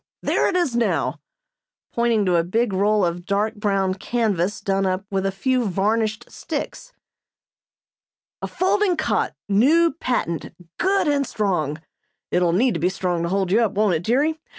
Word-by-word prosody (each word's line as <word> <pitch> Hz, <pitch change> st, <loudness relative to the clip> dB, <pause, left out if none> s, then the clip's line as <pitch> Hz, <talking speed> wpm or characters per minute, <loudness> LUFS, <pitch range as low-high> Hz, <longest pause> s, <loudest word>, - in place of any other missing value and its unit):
There -, -, +2 dB
it -, -, -2 dB
is 345 Hz, -9 st, +1 dB
now," 235 Hz, -1 st, 0 dB, 0.7 s
pointing 235 Hz, -3 st, +1 dB
to 180 Hz, -2 st, +2 dB
a 165 Hz, -, +2 dB
big 220 Hz, +5 st, 0 dB
roll 205 Hz, +1 st, +2 dB
of 175 Hz, +1 st, -3 dB
dark 205 Hz, +2 st, 0 dB
brown 195 Hz, -2 st, 0 dB
canvas 205 Hz, -2 st, -1 dB
done 195 Hz, 0 st, 0 dB
up 185 Hz, +1 st, -2 dB
with 195 Hz, 0 st, 0 dB
a -, -, -1 dB
few 250 Hz, +5 st, 0 dB
varnished 215 Hz, +3 st, 0 dB
sticks. -, -, -6 dB, 1.5 s
"A -, -, -3 dB
folding 380 Hz, -1 st, +1 dB
cot 315 Hz, -, -1 dB
new 280 Hz, +11 st, +4 dB
patent 245 Hz, -, -3 dB, 0.2 s
good 385 Hz, -1 st, +2 dB
and 285 Hz, -2 st, +1 dB
strong. 160 Hz, -8 st, -1 dB, 0.5 s
(It'll 175 Hz, -1 st, +2 dB
need 230 Hz, +7 st, +2 dB
to 165 Hz, -, -3 dB
be 175 Hz, +4 st, +2 dB
strong 180 Hz, -2 st, -2 dB
to 170 Hz, -, -2 dB
hold 190 Hz, -1 st, 0 dB
you 220 Hz, +4 st, +4 dB
up, 220 Hz, -4 st, +1 dB
won't 205 Hz, -2 st, +2 dB
it, 160 Hz, -, 0 dB
dearie?) 290 Hz, -, +1 dB
205 Hz, 165 wpm, -22 LUFS, 185-245 Hz, 1.5 s, new